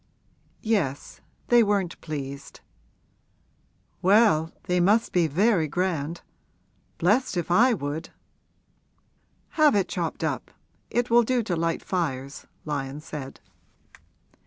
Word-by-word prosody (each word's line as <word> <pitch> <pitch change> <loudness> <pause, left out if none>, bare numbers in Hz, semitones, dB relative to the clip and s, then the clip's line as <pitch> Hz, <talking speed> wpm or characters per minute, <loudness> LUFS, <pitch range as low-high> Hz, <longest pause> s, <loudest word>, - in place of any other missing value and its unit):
'Yes; 170 -12 -2 0.3
they 240 -1 +6
weren't 200 -5 0
pleased.' 140 -3 -7 1.4
'Well, 185 -5 +4
they 180 -1 0
must 210 +6 +2
be 175 -3 +3
very 180 +1 +2
grand! 170 -1 -2 0.8
Blessed 205 +4 +1
if 175 0 -2
I 240 +6 +5
would!' 145 -2 -5 1.4
'Have 305 -7 +4
it 195 -2 +2
chopped 170 -3 -3
up; - - -2 0.4
it 240 0 -1
will 240 +1 +7
do 245 +1 0
to 185 -5 -2
light 165 0 -1
fires,' 140 -6 -3 0.2
Lyon 140 -2 -4
said. 150 -3 -8
175 Hz, 110 wpm, -25 LUFS, 150-215 Hz, 1.4 s, will